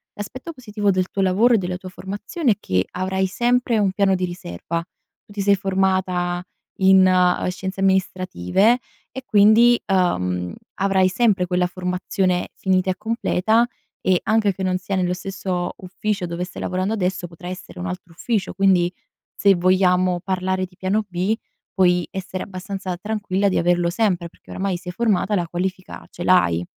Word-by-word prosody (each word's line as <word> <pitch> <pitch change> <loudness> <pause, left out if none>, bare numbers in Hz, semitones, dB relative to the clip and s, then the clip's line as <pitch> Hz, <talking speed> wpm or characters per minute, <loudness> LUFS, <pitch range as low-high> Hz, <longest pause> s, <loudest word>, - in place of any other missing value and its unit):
L'aspetto 255 +10 -7
positivo 210 -6 -2
del 185 -1 0
tuo 195 - -2
lavoro 195 +6 +4
e - - +4
della 180 -1 -3
tua 185 0 -9
formazione 205 - -2
è - - -16
che 95 - 0
avrai 190 +1 -1
sempre 240 +3 +1
un 200 -2 +2
piano 195 0 +2
di 185 0 -1
riserva. 170 - -5 0.4
Tu 205 - -15
ti 200 - -3
sei 200 0 +4
formata 185 -2 0 0.3
in, 190 0 +6
ehm, 180 -1 +3
Scienze 190 +1 -5
Amministrative 190 - +2 0.3
e 265 - -7
quindi, 220 +3 +6
uhm, 90 - 0 0.2
avrai 190 -1 +2
sempre 195 -2 +2
quella 180 0 +1
formazione 180 0 -1
finita 185 0 +1
e - - -3
completa 225 0 +1 0.3
e 185 -2 +2
anche 215 -2 +2
che 190 - -5
non 185 -1 +1
sia 190 +2 -4
nello 180 -1 +1
stesso 180 -1 -3
ufficio 195 +1 -3
dove 170 +1 -4
stai 180 - -9
lavorando 185 +4 -1
adesso 185 -3 -1
potrà 170 +1 -11
essere 185 -1 -9
un 180 - -4
altro 180 -1 -7
ufficio, 210 +3 -2
quindi, 185 -3 +3 0.4
se 200 -1 +4
vogliamo 180 0 +3
parlare 185 0 -1
di 180 0 -19
piano 205 +3 0
B, 185 +3 0 0.4
puoi 180 -2 +3
essere 185 -1 -5
abbastanza 190 -1 -5
tranquilla 200 -1 -1
di - - 0
averlo 175 0 +2
sempre, 180 -3 0
perché - - -18
oramai 190 -1 -2
sei 180 0 -7
formata 210 -1 +1
la 175 -3 -1
qualifica 185 +2 -4
ce 175 - -7
l'hai 130 - +3
185 Hz, 165 wpm, -22 LUFS, 180-200 Hz, 0.4 s, in